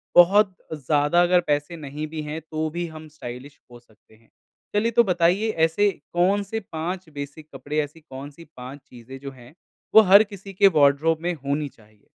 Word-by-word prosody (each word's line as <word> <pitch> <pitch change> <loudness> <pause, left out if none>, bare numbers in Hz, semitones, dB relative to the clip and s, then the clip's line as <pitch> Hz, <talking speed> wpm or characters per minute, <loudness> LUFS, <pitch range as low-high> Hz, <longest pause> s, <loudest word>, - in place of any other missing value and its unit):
बहुत 190 +2 +6 0.2
ज़्यादा 150 +3 +2
अगर 180 0 +4
पैसे 145 +3 -1
नहीं 150 +1 -6
भी 155 0 -6
है 150 +2 -5
तो 155 0 -4
भी 170 +2 -4
हम 155 0 -11
स्टाइलिश 135 -1 -10
हो 120 - -12
सकते 110 -2 -26
हैं, 115 +1 -28 0.5
चलिए 225 +3 +2
तो 235 +1 +5
बताइए 180 +3 +1
ऐसे 200 +5 +3 0.2
कौन-से 200 +5 +1
5 170 +2 -4
बेसिक 145 +1 -8
कपड़े, 145 +3 -3
ऐसी 150 +3 -8
कौन-सी 145 +2 -11
5 130 +3 -9
चीज़ें 125 +2 -11
जो 140 0 -8
हैं 125 +2 -16 0.4
वो 220 - +11
हर 200 +1 +7
किसी 200 -2 -11
के 195 +2 +5
वार्डरोब 145 +3 +3
में 175 0 0
होनी 145 0 -3
चाहिए? 110 -3 -25
155 Hz, 175 wpm, -23 LUFS, 140-180 Hz, 0.5 s, वो